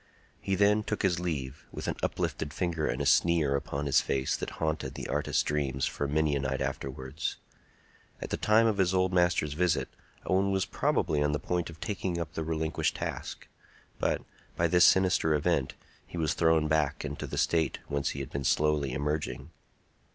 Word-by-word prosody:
He 95 - -1
then 105 +2 +4
took 105 0 -3
his 90 -3 +2
leave, 75 -6 -4
with - - -6
an - - -1
uplifted 75 -1 -2
finger 85 -4 -1
and 65 +3 -1
a - - -3
sneer 75 -1 +3
upon 70 +1 -3
his 70 - +4
face 65 -1 0
that - - -4
haunted 80 -1 -2
the - - -5
artist's 75 - 0
dreams 70 -3 -1
for 70 - -2
many 75 0 +1
a - - 0
night 65 0 -2
afterwards. 65 +1 -4 0.8
At - - -6
the - - +1
time 110 +2 +4
of 110 -3 +1
his 95 0 +3
old 95 0 +2
master's 85 -4 +2
visit, 85 +2 +1 0.4
Owen 95 +1 +2
was 95 -1 +1
probably 75 -2 0
on 75 0 +1
the 75 - 0
point 90 -1 -2
of 80 -2 -11
taking 95 -4 -2
up 80 -2 -5
the 80 - -3
relinquished 80 0 -1
task; - - -5 0.5
but, - - 0 0.3
by 85 - +1
this 90 +2 +5
sinister 90 -4 +4
event, 75 -2 0 0.3
he - - -8
was 80 -2 +1
thrown 80 -2 +3
back 75 -2 0
into - - -5
the - - -5
state 80 -4 +1
whence 70 -1 -1
he 70 - -4
had 65 - -7
been 70 - -3
slowly 75 -1 +2
emerging. 75 +3 -3
80 Hz, 190 wpm, -29 LUFS, 70-90 Hz, 0.8 s, this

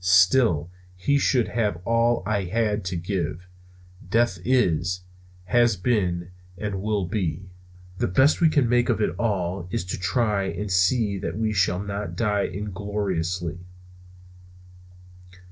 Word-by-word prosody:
Still, 90 - +4 0.2
he 140 +11 +1
should 125 -4 +2
have 105 -5 -1
all 115 -1 +2
I 100 -2 0
had 105 +2 0
to 90 0 -3
give. 85 -1 -3 0.6
Death 115 -5 +2
is, 90 -8 +1 0.4
has 120 +3 +3
been, 90 -4 0 0.3
and 100 -1 -3
will 105 -2 0
be. 95 -1 -3 0.5
The - - +1
best 130 - +3
we 165 - +6
can 145 -5 +2
make 120 +1 +2
of 115 - +1
it 105 - +1
all 95 -5 -1
is 90 - -2
to 90 - -4
try 105 0 +1
and 95 +3 -4
see 100 +3 +2
that 85 +1 -4
we 110 -1 0
shall 95 -3 +2
not 100 +1 -4
die 105 -3 +1
ingloriously. 95 -4 -3
100 Hz, 135 wpm, -24 LUFS, 90-115 Hz, 0.6 s, we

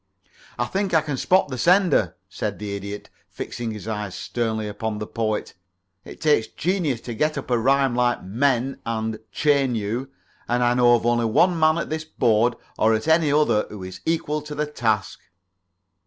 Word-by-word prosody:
"I - - 0
think 195 -2 -1
I 160 - +5
can 150 -2 -3
spot 185 +5 +2
the 130 -2 -5
sender," 175 - +3
said - - -4
the 105 -1 -4
Idiot, 100 +1 -7 0.2
fixing 120 -1 -5
his 105 -1 -7
eyes 105 -3 -4
sternly 110 -3 -2
upon 105 +1 -4
the 105 - -4
Poet. 110 -1 -2 0.5
"It - - -11
takes 150 -8 +2
genius 165 -9 -1
to 120 - -6
get 155 +6 0
up 135 - -5
a 120 - +3
rhyme 135 +1 +3
like 120 0 +1
'menu' 130 +5 0
and 110 -1 -3
'chain 140 -4 +2
you,' 115 +5 -3 0.4
and 120 +1 +1
I 120 0 +3
know 120 -1 +5
of 115 - -2
only 120 0 +2
one 170 +10 +3
man 155 0 +4
at 170 - -3
this 155 0 -2
board 120 -6 +2 0.2
or 110 +1 +4
at 110 - -3
any 160 -2 +4
other 145 -8 +2
who 105 -3 -8
is 95 0 -8
equal 150 -2 0
to 150 0 -8
the 150 +1 0
task." 115 -8 -1
120 Hz, 185 wpm, -23 LUFS, 110-150 Hz, 0.5 s, I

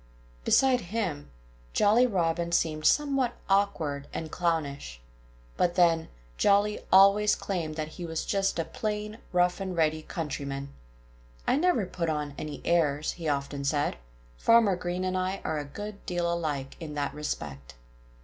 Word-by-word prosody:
Beside 255 - +4
him, 175 -7 -3 0.4
Jolly 230 +5 +5
Robin 170 -4 0
seemed 155 -2 +1
somewhat 275 -4 +2
awkward 165 -8 +1
and 160 -1 -5
clownish. 145 - -2 0.6
But 175 -1 +2
then, 165 -2 +3 0.3
Jolly 205 +1 +3
always 200 +2 +6
claimed 165 -6 -3
that 155 -1 -3
he 175 +2 -7
was 160 -1 -3
just 195 -2 0
a 165 - 0
plain, 210 +3 -4
rough 180 +1 +2
and 190 -2 -4
ready 155 -1 +2
countryman. 140 -3 -5 0.7
"I - - +3
never 310 - +2
put 170 -2 -3
on 150 -2 -2
any 150 0 -6
airs," 155 -3 +2
he 165 -3 -4
often 140 0 -2
said. 145 - 0 0.4
"Farmer 225 - +5
Green 180 0 -3
and 185 0 -1
I 185 +1 -1
are 155 -1 -1
a 145 - -5
good 205 +8 -8
deal 175 -1 0
alike 145 -5 -3
in 155 -3 -7
that 145 -1 -2
respect." 75 - -5
170 Hz, 150 wpm, -28 LUFS, 150-200 Hz, 0.7 s, always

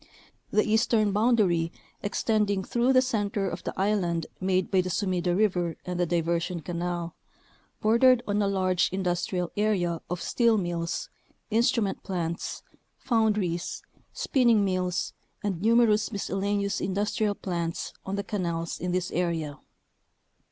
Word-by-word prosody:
The 215 - +3
eastern 220 -1 +3
boundary, 200 -7 +2 0.3
extending 205 -1 0
through 240 +6 +1
the 255 -1 +5
center 205 -5 -1
of 175 -1 -5
the - - -5
island 180 -5 +1
made 185 -1 0
by 190 -2 +4
the 185 - -4
Sumida 180 -2 0
River 180 -5 +1
and 180 -1 -3
the 175 - +2
Diver 170 0 +1
sion 170 0 -4
Canal, 175 +1 -3 0.7
bordered 235 +3 +5
on 205 0 +1
a 200 - +2
large 185 -2 +2
industrial 180 -1 -1
area 185 -6 +1
of 180 0 -2
steel 230 +2 +2
mills, 175 -3 -2 0.4
instrument 230 -2 +2
plants, 170 -2 -3 0.3
foundries, 210 -8 0 0.3
spinning 235 -6 +3
mills, 185 -1 -1 0.3
and 190 -4 -2
numerous 225 -1 +4
miscellaneous 200 0 -1
in 190 0 -2
dustrial 205 0 0
plants 170 -3 -3
on 190 - -3
the 200 - -2
canals 170 -5 -3
in 180 0 -2
this 180 0 -1
area. 165 -4 -2
190 Hz, 135 wpm, -27 LUFS, 175-215 Hz, 0.7 s, the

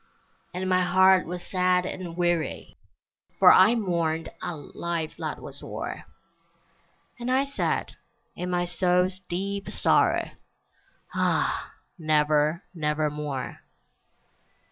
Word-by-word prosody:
And 185 +1 -3
my 185 0 +3
heart 185 0 +4
was 180 +1 -5
sad 180 -1 +2
and 175 -2 -6
weary, 175 -2 -1 0.6
For - - +8
I 230 - +6
mourned 170 -6 -1
a 175 - -4
life 160 +2 -4
that - - -4
was - - -10
o'er, - - -6 1.1
And 240 +1 -3
I 265 +2 +3
said, 280 0 -2 0.4
in 180 +1 -4
my 175 0 0
soul's 180 +1 +1
deep 195 +3 -3
sorrow, - - +2 0.8
"Ah! - - 0 0.3
never, 155 +1 +2
nevermore!" 150 -4 -2
175 Hz, 105 wpm, -26 LUFS, 160-185 Hz, 1.1 s, For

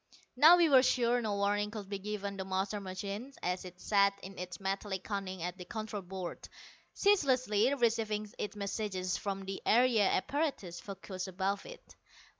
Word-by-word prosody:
Now 315 +7 +8
we 340 -2 +5
were 270 -4 +7
sure 245 -1 +2
no 215 -3 -1
warning 205 +1 +1
could 210 -2 -7
be 200 0 -4
given 200 0 -4
the 190 - -4
master 190 +2 -1
machine 200 +6 -5
as 180 +1 -1
it 180 0 -10
sat 200 0 +3
in 195 0 -9
its 180 -1 -6
metallic 195 -1 -3
cunning 190 -4 -4
at 180 +1 -4
the 180 - -7
control 215 -1 -5
board, 185 -1 -7 0.4
ceaselessly 260 - +3
receiving 220 -4 +1
its 210 0 -3
messages 200 -3 -2
from 195 -1 -3
the 195 0 -5
area 230 -3 +4
apparatus 275 - -1
focussed 195 -1 -6
above 190 +2 -2
it. - - -13
200 Hz, 165 wpm, -33 LUFS, 190-225 Hz, 0.4 s, Now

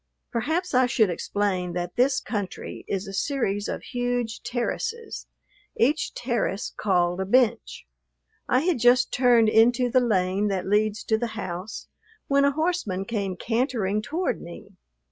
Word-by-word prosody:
Perhaps 320 +10 -1
I 255 0 +4
should 220 -6 +2
explain 185 -1 -1
that 175 0 -4
this 255 +2 +3
country 205 -5 -5
is 195 +1 -3
a 195 - -7
series 205 -4 -1
of - - -4
huge 245 -2 -2
terraces, 450 - -4 0.5
each 290 +7 +1
terrace 235 -5 -2
called 180 -2 +1
a - - -1
bench. 240 0 +1 0.6
I 255 +1 +3
had 335 -4 +1
just 245 +1 +4
turned 245 -3 +4
into 240 +3 +4
the 255 - +5
lane 195 -3 +1
that 190 -2 -1
leads 210 +1 +1
to 220 -1 +1
the 240 - -1
house 185 +1 -6 0.4
when 280 0 +3
a 280 - +4
horseman 310 - -1
came 200 -4 -2
cantering 225 -4 0
toward 340 +10 -2
me. 170 - -10
225 Hz, 145 wpm, -25 LUFS, 195-255 Hz, 0.6 s, the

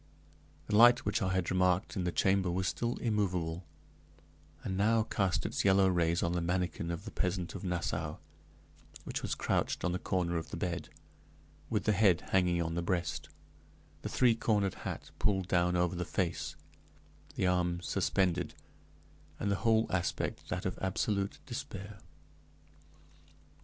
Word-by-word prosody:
The - - -1
light 120 +2 +7
which 105 0 0
I 95 -2 +1
had 95 -1 0
remarked 90 +3 +2
in 90 -3 -1
the 90 - 0
chamber 95 0 +2
was 90 +1 0
still 120 +4 -1
immovable, 90 -7 -1 1.0
and 95 - -2
now 110 +3 +3
cast 95 -4 0
its - - -1
yellow 95 -1 +5
rays 85 -1 +2
on 85 - +1
the 90 0 0
manikin 85 -1 -1
of 85 +3 -4
the 110 - -6
peasant 90 -1 -2
of - - -7
Nassau, 85 -3 -2 0.9
which - - -4
was - - -2
crouched - - 0
on 90 - +1
the 90 - -2
corner 90 -2 0
of 80 - -5
the - - -5
bed, 85 -2 -3 0.8
with - - 0
the 110 - +3
head 100 -4 +4
hanging 90 -2 +3
on 80 0 -3
the 85 - -1
breast, 85 0 -2 0.7
the - - -4
three 125 -3 +4
cornered 105 -4 +1
hat - - -6
pulled 95 -3 +1
down 90 -1 +2
over 90 0 +1
the 90 - -2
face, 90 -3 -2 0.8
the - - 0
arms 90 -1 +1
suspended, 95 -3 +1 0.8
and 100 - 0
the 100 - +1
whole 110 -1 +4
aspect 90 -2 -2
that 90 - -3
of 90 - -2
absolute 100 +1 -1
despair. 105 -5 -7
90 Hz, 155 wpm, -32 LUFS, 85-100 Hz, 1.0 s, light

